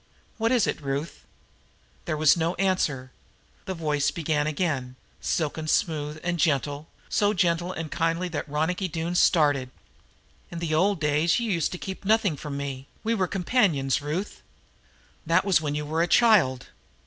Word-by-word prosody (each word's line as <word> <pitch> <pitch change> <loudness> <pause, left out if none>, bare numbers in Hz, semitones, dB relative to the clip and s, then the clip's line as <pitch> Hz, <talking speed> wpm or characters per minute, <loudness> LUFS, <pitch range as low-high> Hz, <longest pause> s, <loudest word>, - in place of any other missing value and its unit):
What 225 +2 +1
is 245 -5 +3
it, - - -2
Ruth?" 140 +3 -4 0.8
There 155 - -2
was 155 -1 +5
no 170 +1 -1
answer. 155 -9 0 0.5
Then 190 -2 -4
the - - -13
voice 150 -2 +1
began 155 -2 -1
again, 140 -5 -2 0.2
silken 155 0 -2
smooth 155 -1 0
and 175 -1 -1
gentle, 145 -1 0 0.2
so 205 0 +2
gentle 175 -1 +1
and 160 -4 -6
kindly 165 +2 0
that 155 -2 -4
Ronicky 160 +6 -1
Doone 165 0 -3
started. 145 -7 +3 0.8
"In 170 - -7
the 165 -2 -2
old 190 +4 +2
days 150 +4 +2
you 230 -2 -1
used 170 -4 0
to - - -4
keep 190 +2 -7
nothing 210 -4 +2
from 140 0 -6
me; 135 -1 -5 0.2
we 225 +1 +1
were 190 -5 0
companions, 175 - +1
Ruth. 160 +8 -4 0.9
That 170 +4 +3
was 190 -5 +3
when 145 -2 -2
you 150 0 -3
were 160 +2 -1
a 170 - +2
child. 175 - +4
160 Hz, 165 wpm, -26 LUFS, 150-185 Hz, 0.9 s, was